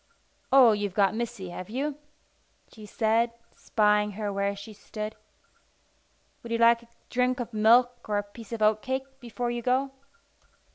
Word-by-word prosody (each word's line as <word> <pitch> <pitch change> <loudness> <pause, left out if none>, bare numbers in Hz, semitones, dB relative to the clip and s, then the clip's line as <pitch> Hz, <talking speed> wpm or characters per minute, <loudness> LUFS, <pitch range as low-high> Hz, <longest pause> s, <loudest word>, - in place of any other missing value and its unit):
"Oh, 260 -4 +8
you've 205 -3 -2
got 200 -1 +3
Missy, 225 -4 -4
have 180 +2 -8
you?" 280 +5 -3 0.7
she 215 -2 -11
said, 230 +2 +1 0.2
spying 210 -1 +1
her 205 0 -3
where 200 0 -1
she 200 +2 -10
stood. 215 +1 -7 1.3
"Would 235 - -9
you 230 - +1
like 235 0 +5
a 235 - -19 0.2
drink 250 +1 +1
of 240 -1 -5
milk 240 +3 +3
or 205 - +1
a 205 - 0
piece 205 +2 -13
of 225 -2 -2
oatcake 260 +5 0
before 240 0 -4
you 240 0 -3
go?" 260 +3 +1
225 Hz, 155 wpm, -27 LUFS, 210-245 Hz, 1.3 s, Oh